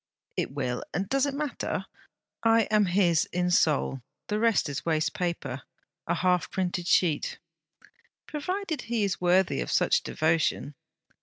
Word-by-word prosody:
It - - -1
will; 130 -3 -2
and 190 +3 -1
does 275 +4 +2
it 280 - -3
matter? 295 -2 -3 0.6
I 225 0 +4
am 210 -1 +4
his 175 -3 +3
in 180 0 -1
soul; 145 -5 +2 0.3
the 210 0 0
rest 230 -6 +3
is 140 -1 -4
waste 160 -2 0
paper 170 -7 -3 0.5
a - - +1
half 180 -2 +1
printed 180 -2 -2
sheet.' 165 -6 +2 0.9
'Provided 330 0 -3
he 230 -2 -1
is 195 -3 -1
worthy 180 - +3
of - - -4
such - - +3
devotion!' 160 -3 0
180 Hz, 145 wpm, -27 LUFS, 160-225 Hz, 0.9 s, I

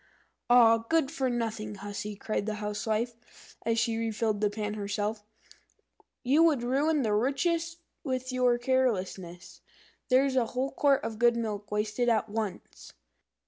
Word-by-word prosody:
"Ah, 230 -2 +7
good 275 +5 0
for 270 -5 -1
nothing 220 -3 -3
hussy!" 205 +1 -6
cried 210 0 -3
the 215 - -2
Housewife, 215 +3 -4
as 230 0 +2
she 230 0 +1
refilled 220 -2 -1
the 210 - +3
pan 210 0 -4
herself, 205 +1 -3 1.0
"you 275 +5 +4
would 305 -7 +4
ruin 285 +4 +1
the 215 -2 +1
richest 330 +9 0 0.3
with 255 -2 -3
your 250 -1 +2
carelessness. 195 -9 -2 0.5
There's 265 +1 +3
a 245 -3 +2
whole 265 +2 0
quart 275 0 +2
of 220 -1 -5
good 240 0 +4
milk 210 -3 -4
wasted 210 +3 0
at 220 -1 +1
once!" 210 -3 -6
230 Hz, 140 wpm, -29 LUFS, 210-255 Hz, 1.0 s, Ah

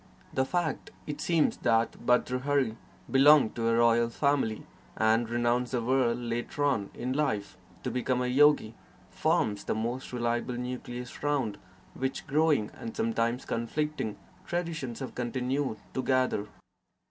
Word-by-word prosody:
The 130 - +2
fact, 170 -1 -2 0.2
it 145 -1 -5
seems, 165 -3 +2
that 115 0 +2 0.2
Bhartrhari 125 0 +2 0.4
belonged 140 -2 +6
to 115 -1 -1
a 115 - +3
royal 115 0 +4
family 135 -4 0 0.3
and 110 +1 +3
renounced 120 +1 0
the 125 - +1
world 125 -1 +2
later 120 +4 -3
on 120 -9 +1
in 125 +2 -2
life 130 -9 -1 0.3
to - - -2
become 125 0 0
a 125 - 0
yogi, 135 -3 +4 0.4
forms 105 -1 0
the - - -1
most 120 +4 -3
reliable 120 0 -1
nucleus 125 0 -6
round 135 -8 0 0.3
which 130 +1 -3
growing, 150 -6 +2
and 230 0 -8
sometimes 130 - 0
conflicting, 115 -1 -2 0.3
traditions 165 -8 -3
have 130 - -5
continued 125 +1 -2 0.2
to 130 - -1
gather. 130 -6 +1
125 Hz, 135 wpm, -29 LUFS, 115-145 Hz, 0.4 s, belonged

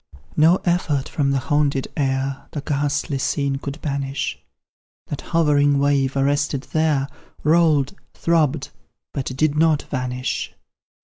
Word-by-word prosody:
No 160 +3 +6
effort 165 -6 +1
from 140 -3 0
the 140 - +2
haunted 140 0 +1
air 135 -1 -1
The 145 - -3
ghastly 145 -1 -1
scene 140 +1 0
could 140 +2 -6
banish, 140 -2 -2 0.7
That 145 - -4
hovering 145 -4 +3
wave, 140 -1 +2
arrested 140 0 +1
there, 155 -4 +2 0.4
Rolled 155 -3 +3 0.2
throbbed 160 -4 +1 0.4
but 135 -3 -3
did 145 +3 +1
not 155 -1 +3
vanish. 125 -1 -3
145 Hz, 120 wpm, -22 LUFS, 135-150 Hz, 0.7 s, No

